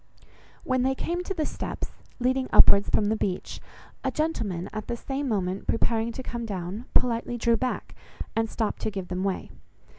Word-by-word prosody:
When 255 -1 +1
they 265 +1 +2
came 345 +5 -1
to 390 - -1
the 315 -3 0
steps, - - -4 0.3
leading 255 +1 +1
upwards 200 0 +7
from 210 - +3
the 220 - +2
beach, 190 -4 -2 0.4
a - - +2
gentleman, 210 - -1
at 215 -1 -4
the 235 - -2
same 275 +3 -2
moment 190 -4 -1
preparing 225 0 +1
to 260 - -5
come 235 -1 -4
down, 195 +3 -4
politely 240 0 +2
drew 235 0 +3
back, 255 +2 -2 0.4
and 225 0 +1
stopped 220 -1 -1
to - - 0
give 195 -3 -5
them 185 +1 -1
way. 195 -1 -1
230 Hz, 180 wpm, -27 LUFS, 200-255 Hz, 0.4 s, upwards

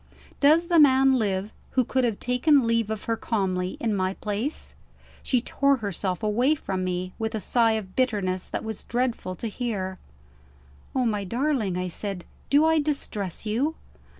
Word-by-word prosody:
Does 310 +4 +5
the 340 -1 +4
man 270 -2 +6
live 200 -1 -1 0.2
who 255 - +6
could 260 +2 0
have 225 -4 -1
taken 255 +2 +3
leave 230 -2 +1
of 220 -1 -4
her 230 - 0
calmly, 190 -5 -1
in 225 -3 0
my 185 0 -1
place? 215 +8 -3 0.5
She 250 -3 +1
tore 275 +3 +2
herself 195 -4 -3
away 240 +8 +2
from 190 -9 -3
me, 185 0 -3
with 220 0 -2
a - - -1
sigh 230 +1 +3
of 200 -4 -4
bitterness 200 -8 0
that - - -3
was 220 -2 -5
dreadful 240 -6 -2
to 230 - -5
hear. 200 -5 -3 1.0
"Oh, 255 -1 +2
my 210 -3 0
darling," 235 -3 0
I 180 0 -2
said, 190 0 -5 0.2
"do 290 +3 +5
I 320 0 +4
distress 225 - -2
you?" 255 +9 0
225 Hz, 170 wpm, -25 LUFS, 195-260 Hz, 1.0 s, man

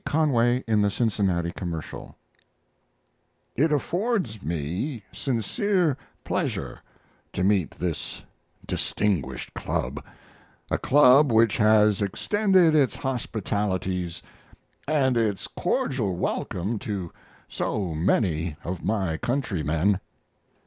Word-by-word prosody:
Conway 125 -5 +2
in 110 -2 +3
the 100 - +3
Cincinnati 95 -6 0
Commercial 85 -4 -6 1.4
It 150 +6 +2
affords 170 - -1
me 90 - -3
sincere 150 - 0 0.3
pleasure - - -2 0.5
to 90 - -1
meet 95 -4 +1
this 85 -3 -4 0.4
distinguished 75 -12 -1
club, - - -3 0.7
a - - +1
club 140 0 +6
which 115 -1 +4
has 105 -2 +4
extended 185 - +3
its 145 -4 +3
hospitalities 100 - -2 0.6
and 140 -4 +2
its 110 -5 0
cordial 110 -9 -1
welcome 95 +4 -2
to 100 -8 -4 0.4
so 95 -6 -2
many 80 -1 +1
of 90 0 -5
my 95 -7 0
countrymen. 95 - 0
105 Hz, 95 wpm, -25 LUFS, 90-130 Hz, 1.4 s, club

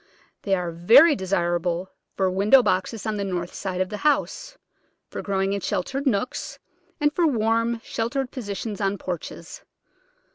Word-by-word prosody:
They 195 -1 +1
are 180 -2 -3
very 230 - +6
desirable 175 -1 -1 0.3
for 190 - +2
window 210 +8 +5
boxes 190 +3 -1
on 215 -1 -1
the 200 - -2
north 180 -2 -3
side 185 -2 -4
of 185 - -1
the 210 - -5
house, - - -1 0.5
for - - -5
growing 195 -1 -1
in 200 - -2
sheltered 275 +12 -2
nooks, 240 0 -1 0.4
and 295 0 +2
for 340 -1 +2
warm, 230 -2 +1
sheltered 250 +3 -2
positions 210 -3 -5
on 195 0 0
porches. 180 -3 -7
200 Hz, 150 wpm, -24 LUFS, 185-240 Hz, 0.5 s, very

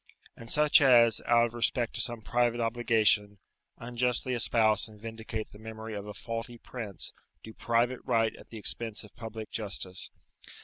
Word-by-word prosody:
And 115 - -11
such 150 +3 +5
as, 120 -4 +6
out 120 0 +5
of 120 - -5
respect 120 0 0
to - - -2
some 120 -2 -4
private 120 +1 +1
obligation, 115 -3 +2 0.4
unjustly 125 +1 -1
espouse 110 -2 +3
and 105 -1 -15
vindicate 110 0 -5
the 105 - -14
memory 110 0 -7
of 100 0 -5
a 105 - -6
faulty 115 +4 -5
prince, 110 -5 -7 0.3
do 110 - -10
private 120 +3 +1
right 115 -1 +1
at - - -15
the 115 - -8
expense 110 +1 -2
of 105 - -14
public 110 -2 -7
justice. 95 -4 -3
115 Hz, 165 wpm, -30 LUFS, 110-120 Hz, 0.4 s, as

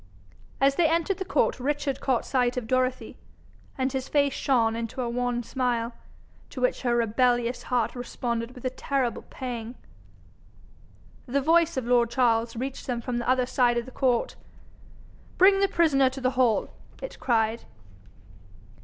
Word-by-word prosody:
As 275 0 +3
they 330 -3 +4
entered 335 +4 0
the 380 - -3
court, 360 - +1
Richard 285 +1 -1
caught 260 -4 0
sight 250 -2 0
of 250 - -2
Dorothy, 255 +2 -1 0.6
and 260 0 -1
his 265 -1 -3
face 285 -2 +2
shone 230 -4 +1
into 230 +2 -5
a 250 - -1
wan 245 0 -1
smile, 240 -2 -1 0.6
to - - -8
which - - 0
her 240 -2 +1
rebellious 240 +1 +1
heart 245 -3 -1
responded 240 -1 -4
with 250 - -11
a 255 - 0
terrible 260 -2 -2
pang. 240 -2 -6 1.5
The 270 +3 +1
voice 330 +2 +3
of 260 - -1
lord 240 -1 +3
Charles 230 -2 +1
reached 260 +3 -5
them 245 -2 -1
from 240 +1 -3
the 240 - -3
other 255 -1 +3
side 245 -1 +2
of 235 - -1
the 260 - -11
court. 250 -3 0 1.0
'Bring 390 +1 +6
the 395 - +3
prisoner 300 -8 +3
to 265 +1 -8
the 255 0 +1
hall,' 250 -3 +1 0.3
it - - -8
cried. 225 -2 0
250 Hz, 160 wpm, -26 LUFS, 240-270 Hz, 1.5 s, Bring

